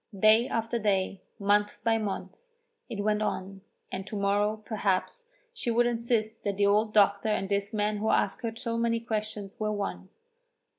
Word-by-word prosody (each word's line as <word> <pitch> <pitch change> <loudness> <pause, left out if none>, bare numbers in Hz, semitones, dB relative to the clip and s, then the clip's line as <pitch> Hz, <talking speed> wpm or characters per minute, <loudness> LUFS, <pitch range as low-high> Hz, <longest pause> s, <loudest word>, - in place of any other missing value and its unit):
Day 220 +4 +6
after 230 +1 -1
day, 195 -2 0 0.2
month 205 0 +2
by 225 -1 +3
month, 205 -3 -4 0.5
it 205 -4 -3
went 210 0 +1
on, 195 -2 -3 0.3
and 190 +1 -5
to 215 - -6
morrow, 205 +1 +1
perhaps, 215 - -1 0.2
she 455 - -3
would 235 +1 +3
insist 230 -2 0
that 200 -1 -1
the 200 - +3
old 210 +2 +3
doctor 200 0 +4
and 195 -2 0
this 200 0 0
man 210 -1 0
who 220 +1 0
asked 200 - +1
her 230 -2 -3
so 230 -1 -3
many 230 0 +1
questions 215 -1 -4
were 215 0 0
one. 200 -2 -4
215 Hz, 170 wpm, -29 LUFS, 200-230 Hz, 0.5 s, Day